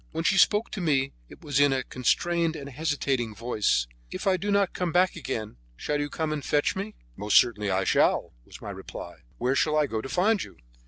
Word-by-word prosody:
When 165 Hz, +1 st, -2 dB
she 195 Hz, +2 st, +3 dB
spoke 210 Hz, +4 st, +3 dB
to 205 Hz, -, -4 dB
me 135 Hz, -5 st, +1 dB, 0.2 s
it -, -, -14 dB
was 140 Hz, -2 st, 0 dB
in 145 Hz, -1 st, +5 dB
a 130 Hz, -1 st, 0 dB
constrained 165 Hz, +7 st, 0 dB
and 140 Hz, -3 st, -7 dB
hesitating 135 Hz, -6 st, -1 dB
voice: 105 Hz, -, +1 dB, 0.2 s
"If -, -, -6 dB
I 190 Hz, -1 st, +4 dB
do 200 Hz, +3 st, -3 dB
not 200 Hz, -2 st, +2 dB
come 180 Hz, -2 st, -2 dB
back 180 Hz, +2 st, +3 dB
again, 115 Hz, -, -5 dB, 0.2 s
shall 150 Hz, -, -2 dB
you 145 Hz, 0 st, -2 dB
come 155 Hz, 0 st, -2 dB
and 150 Hz, -2 st, -4 dB
fetch 145 Hz, -1 st, +1 dB
me?" 200 Hz, +3 st, -5 dB, 0.2 s
"Most 105 Hz, +1 st, +3 dB
certainly 105 Hz, -3 st, +3 dB
I 95 Hz, 0 st, +1 dB
shall," -, -, +2 dB
was -, -, -13 dB
my -, -, -5 dB
reply. -, -, -9 dB, 0.2 s
"Where 125 Hz, -, +1 dB
shall 150 Hz, +2 st, +2 dB
I 150 Hz, -, +4 dB
go 110 Hz, -5 st, -3 dB
to 135 Hz, -, -7 dB
find 200 Hz, +5 st, +2 dB
you?" -, -, -13 dB
145 Hz, 220 wpm, -27 LUFS, 125-175 Hz, 0.2 s, in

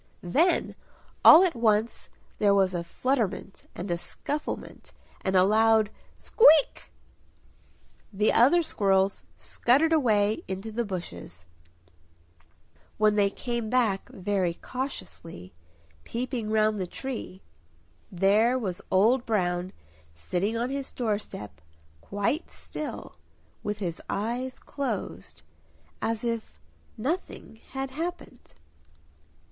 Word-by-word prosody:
Then 310 Hz, -, +2 dB, 0.5 s
all 330 Hz, +4 st, +10 dB
at 365 Hz, -, +2 dB
once 225 Hz, -2 st, 0 dB, 0.3 s
there 200 Hz, -1 st, +4 dB
was 190 Hz, -2 st, +3 dB
a 175 Hz, -1 st, -2 dB
flutterment 210 Hz, 0 st, -2 dB
and 180 Hz, +1 st, -5 dB
a 170 Hz, -, 0 dB
scufflement 290 Hz, -, -5 dB, 0.3 s
and 190 Hz, -, 0 dB
a 185 Hz, -, +6 dB
loud 220 Hz, +1 st, +4 dB, 0.2 s
"Squeak!" 320 Hz, -, +4 dB, 1.2 s
The 210 Hz, +1 st, +2 dB
other 335 Hz, +9 st, +5 dB
squirrels 195 Hz, -7 st, +1 dB
scuttered 290 Hz, +7 st, +2 dB
away 215 Hz, -8 st, +2 dB
into 190 Hz, +4 st, -5 dB
the 235 Hz, +2 st, -1 dB
bushes. 90 Hz, -, -7 dB, 1.5 s
When 215 Hz, 0 st, +4 dB
they 205 Hz, -1 st, +3 dB
came 235 Hz, +1 st, -4 dB
back 225 Hz, -6 st, +1 dB
very 190 Hz, -3 st, -1 dB
cautiously, 185 Hz, -, -7 dB, 0.5 s
peeping 240 Hz, -2 st, -4 dB
round 215 Hz, -1 st, +2 dB
the 185 Hz, -, -3 dB
tree 225 Hz, -4 st, -7 dB, 0.7 s
there 205 Hz, +7 st, +3 dB
was 190 Hz, -8 st, -4 dB
Old 225 Hz, +7 st, +3 dB
Brown 180 Hz, -4 st, 0 dB, 0.4 s
sitting 180 Hz, -, -2 dB
on 240 Hz, +3 st, -1 dB
his 275 Hz, -1 st, -4 dB
door 220 Hz, -4 st, -1 dB
step, 100 Hz, -, -10 dB, 0.4 s
quite 205 Hz, -, -2 dB
still, 305 Hz, -, -7 dB, 0.4 s
with 210 Hz, 0 st, -3 dB
his 175 Hz, -5 st, -4 dB
eyes 240 Hz, +5 st, -3 dB
closed, 215 Hz, -, -5 dB, 0.6 s
as 225 Hz, 0 st, -2 dB
if 230 Hz, -, -4 dB, 0.4 s
nothing 280 Hz, -3 st, -4 dB, 0.2 s
had 270 Hz, 0 st, -3 dB
happened. 320 Hz, -4 st, -6 dB
215 Hz, 110 wpm, -27 LUFS, 190-255 Hz, 1.5 s, all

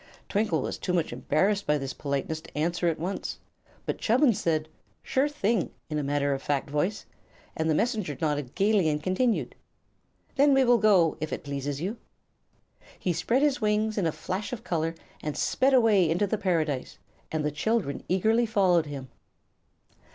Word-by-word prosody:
Twinkle 210 Hz, +1 st, +1 dB
was -, -, -4 dB
too 180 Hz, -, -2 dB
much 170 Hz, -3 st, 0 dB
embarrassed 200 Hz, +7 st, +1 dB
by 150 Hz, -, +3 dB
this 135 Hz, -2 st, -4 dB
politeness 140 Hz, +2 st, -3 dB
to -, -, -12 dB
answer 170 Hz, +3 st, 0 dB
at 165 Hz, -2 st, +1 dB
once, 180 Hz, +5 st, -4 dB, 0.5 s
but -, -, -3 dB
Chubbins 240 Hz, -1 st, +3 dB
said 155 Hz, -2 st, 0 dB, 0.4 s
"Sure 270 Hz, +3 st, +1 dB
thing!" 230 Hz, -, 0 dB, 0.2 s
in 150 Hz, -, 0 dB
a -, -, -2 dB
matter 140 Hz, 0 st, +1 dB
of 135 Hz, -, -3 dB
fact 140 Hz, -1 st, -1 dB
voice, 175 Hz, +8 st, -1 dB, 0.5 s
and 160 Hz, 0 st, 0 dB
the 155 Hz, -, +3 dB
Messenger 210 Hz, -, -1 dB
nodded 145 Hz, -4 st, -2 dB
gaily 200 Hz, -3 st, +3 dB
and 150 Hz, 0 st, -2 dB
continued: 220 Hz, +6 st, 0 dB, 0.8 s
"Then 280 Hz, 0 st, +5 dB
we 270 Hz, -, +5 dB
will 245 Hz, -1 st, +4 dB
go, 190 Hz, -8 st, +4 dB
if 155 Hz, -, -3 dB
it -, -, -4 dB
pleases 140 Hz, 0 st, -4 dB
you." 200 Hz, +7 st, -3 dB, 1.0 s
He 180 Hz, -, -1 dB
spread 230 Hz, -, +1 dB
his 285 Hz, -3 st, +2 dB
wings 215 Hz, 0 st, +1 dB
in 195 Hz, -5 st, +1 dB
a -, -, +1 dB
flash 185 Hz, +6 st, -4 dB
of 235 Hz, -2 st, -5 dB
color 165 Hz, -6 st, -1 dB, 0.3 s
and 150 Hz, -1 st, -4 dB
sped 265 Hz, +1 st, +2 dB
away 210 Hz, -8 st, +4 dB
into 175 Hz, +5 st, +2 dB
the 200 Hz, -, -1 dB
Paradise, 160 Hz, -9 st, -1 dB, 0.3 s
and 155 Hz, -1 st, -1 dB
the 150 Hz, -, 0 dB
children 180 Hz, 0 st, -1 dB
eagerly 220 Hz, +6 st, +2 dB
followed 185 Hz, -7 st, +3 dB
him. 140 Hz, -2 st, -6 dB
180 Hz, 175 wpm, -27 LUFS, 150-215 Hz, 1.0 s, Then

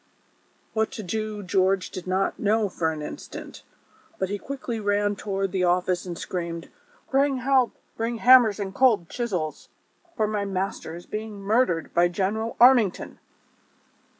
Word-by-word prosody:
" -, -, -39 dB
"What 220 Hz, 0 st, +1 dB
to 215 Hz, -, -6 dB
do 215 Hz, +2 st, -3 dB
George 190 Hz, 0 st, +1 dB
did 185 Hz, 0 st, -7 dB
not 190 Hz, +1 st, 0 dB
know 210 Hz, 0 st, +2 dB
for 165 Hz, -3 st, -1 dB
an 155 Hz, -1 st, -6 dB
instant; -, -, -8 dB, 0.6 s
but 190 Hz, -, -1 dB
he 205 Hz, 0 st, -3 dB
quickly 255 Hz, -3 st, -5 dB
ran 205 Hz, 0 st, +1 dB
toward 195 Hz, -1 st, -2 dB
the 190 Hz, -2 st, 0 dB
office 180 Hz, 0 st, +1 dB
and 175 Hz, -1 st, -5 dB
screamed: 170 Hz, -2 st, -5 dB, 0.2 s
" -, -, -31 dB
Bring 275 Hz, 0 st, +3 dB
help; 255 Hz, -1 st, +2 dB, 0.2 s
bring 230 Hz, +1 st, -2 dB
hammers 240 Hz, -4 st, +6 dB
and 195 Hz, -1 st, -4 dB
cold 215 Hz, -8 st, +3 dB
chisels, 185 Hz, -11 st, -3 dB, 0.5 s
for 215 Hz, -, +2 dB
my 210 Hz, -1 st, -1 dB
master 190 Hz, -4 st, -3 dB
is 175 Hz, -, -10 dB
being 215 Hz, -1 st, -6 dB
murdered 200 Hz, -5 st, +1 dB
by 175 Hz, +1 st, +4 dB
General 200 Hz, +6 st, -2 dB
Armington 240 Hz, -6 st, +4 dB
205 Hz, 155 wpm, -25 LUFS, 185-225 Hz, 0.6 s, hammers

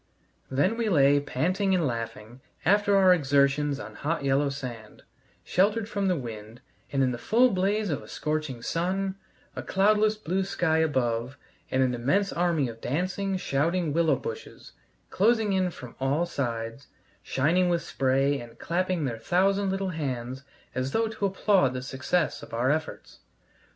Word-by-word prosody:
Then 145 Hz, +12 st, +1 dB
we 230 Hz, -2 st, 0 dB
lay 145 Hz, -5 st, +5 dB
panting 185 Hz, +8 st, 0 dB
and 175 Hz, -3 st, +1 dB
laughing 115 Hz, -1 st, -5 dB, 0.2 s
after 205 Hz, +1 st, +4 dB
our 190 Hz, -1 st, +6 dB
exertions 140 Hz, -2 st, +2 dB
on -, -, -8 dB
hot 160 Hz, 0 st, -2 dB
yellow 140 Hz, +1 st, +2 dB
sand, 125 Hz, -6 st, -8 dB, 0.4 s
sheltered 205 Hz, +4 st, +1 dB
from 200 Hz, -3 st, -1 dB
the 185 Hz, -, +2 dB
wind, 115 Hz, -2 st, -8 dB, 0.3 s
and 135 Hz, -2 st, +2 dB
in 130 Hz, -, +2 dB
the 120 Hz, -, -5 dB
full 240 Hz, -, +3 dB
blaze 200 Hz, +1 st, 0 dB
of 145 Hz, -, -2 dB
a -, -, -13 dB
scorching 150 Hz, -6 st, -3 dB
sun, 190 Hz, +3 st, -1 dB, 0.4 s
a -, -, -4 dB
cloudless 210 Hz, +2 st, +3 dB
blue 190 Hz, -2 st, -1 dB
sky 170 Hz, -4 st, +1 dB
above, 130 Hz, -4 st, 0 dB, 0.3 s
and 130 Hz, 0 st, +2 dB
an 125 Hz, -1 st, +1 dB
immense 140 Hz, +12 st, +1 dB
army 170 Hz, -5 st, +1 dB
of 115 Hz, -1 st, -9 dB
dancing, 185 Hz, +7 st, -1 dB
shouting 165 Hz, +1 st, 0 dB
willow 165 Hz, 0 st, +3 dB
bushes, 460 Hz, 0 st, -8 dB, 0.4 s
closing 220 Hz, 0 st, +2 dB
in 185 Hz, -1 st, +1 dB
from 125 Hz, -8 st, -11 dB
all 140 Hz, +6 st, +1 dB
sides, 120 Hz, -4 st, -4 dB, 0.3 s
shining 170 Hz, -, +1 dB
with 170 Hz, -1 st, 0 dB
spray 135 Hz, +1 st, +1 dB
and 115 Hz, -1 st, -12 dB
clapping 180 Hz, -1 st, -1 dB
their 115 Hz, -4 st, -3 dB
thousand 195 Hz, -, +2 dB
little 195 Hz, 0 st, -1 dB
hands 130 Hz, -5 st, -4 dB, 0.3 s
as 130 Hz, +1 st, -2 dB
though 225 Hz, 0 st, +2 dB
to 210 Hz, -2 st, -1 dB
applaud 190 Hz, -8 st, +2 dB
the 125 Hz, -, -4 dB
success 140 Hz, +5 st, -1 dB
of -, -, -8 dB
our 125 Hz, +3 st, +2 dB
efforts. 155 Hz, +1 st, -4 dB
155 Hz, 160 wpm, -27 LUFS, 130-190 Hz, 0.4 s, our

